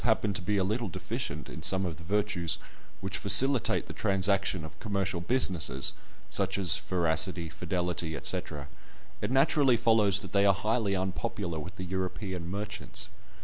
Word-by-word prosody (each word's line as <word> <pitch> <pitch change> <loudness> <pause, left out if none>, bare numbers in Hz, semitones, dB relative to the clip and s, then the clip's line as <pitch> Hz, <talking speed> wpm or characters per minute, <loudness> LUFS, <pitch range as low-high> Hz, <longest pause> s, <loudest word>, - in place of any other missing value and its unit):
happen 110 -3 +1
to 90 - -4
be 100 +4 -1
a 95 - +1
little 110 +3 -2
deficient 95 - -6
in - - -9
some 95 0 +4
of 85 -4 -5
the 85 - -13
virtues 100 -3 -1 0.4
which 95 0 -4
facilitate 125 +6 +6
the - - -9
transaction 95 -3 0
of 80 - -13
commercial 100 -4 -3
business 85 - 0 0.4
(such 95 0 +2
as 95 -5 +5
veracity, 85 -1 +1
fidelity, 85 -1 -3
&c.), - - +1 0.8
it - - -2
naturally 135 -1 +3
follows 105 -4 +2
that 95 -3 -11
they 100 0 +3
are 100 -1 +4
highly 105 0 -1
unpopular 95 -2 -4
with 90 +5 -9
the 90 - -7
European 95 -1 -5
merchants. 105 +2 -4
95 Hz, 155 wpm, -28 LUFS, 90-105 Hz, 0.8 s, facilitate